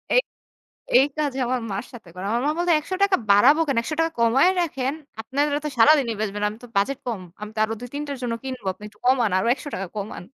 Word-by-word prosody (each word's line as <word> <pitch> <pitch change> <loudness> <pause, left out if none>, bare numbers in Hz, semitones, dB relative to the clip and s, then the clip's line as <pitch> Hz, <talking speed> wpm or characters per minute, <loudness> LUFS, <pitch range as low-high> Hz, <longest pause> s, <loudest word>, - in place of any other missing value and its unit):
এই - - +6 0.8
এই 265 - +6
কাজ 290 -3 0
আমার 255 +1 0
মার 195 - -3
সাথে 220 -7 -12
করে 185 +1 -7
আমার 235 - +1
মা - - +3
বলছে 345 0 +2
"৳১০০ 375 +5 +1
বাড়াবো 255 +10 +6
কেন 270 -4 0
৳১০০ 325 +5 -1
কমায় 245 +10 +4
রাখেন 270 -5 -1 0.3
আপনারা 285 +4 0
তো - - 0
সারাদিনই 250 -1 +5
বেচবেন 205 -1 -2
আমি 215 - -9
তো - - -9
বাজেট 255 +7 +1
কম 220 -6 -3 0.2
আমি 210 - -5
তো - - -3
আরও 220 - -1
২ 245 - -7
৩ 290 - -3
টার 280 -2 -4
জন্য 240 -2 -1
কিনব 260 -3 -6
আপনি 205 - -17
একটু 210 0 -19
কমান, 250 -3 +3
আরো 190 - 0
৳১০০ 255 -8 -6
কমান।" 200 -3 -5
255 Hz, 220 wpm, -23 LUFS, 215-290 Hz, 0.8 s, এই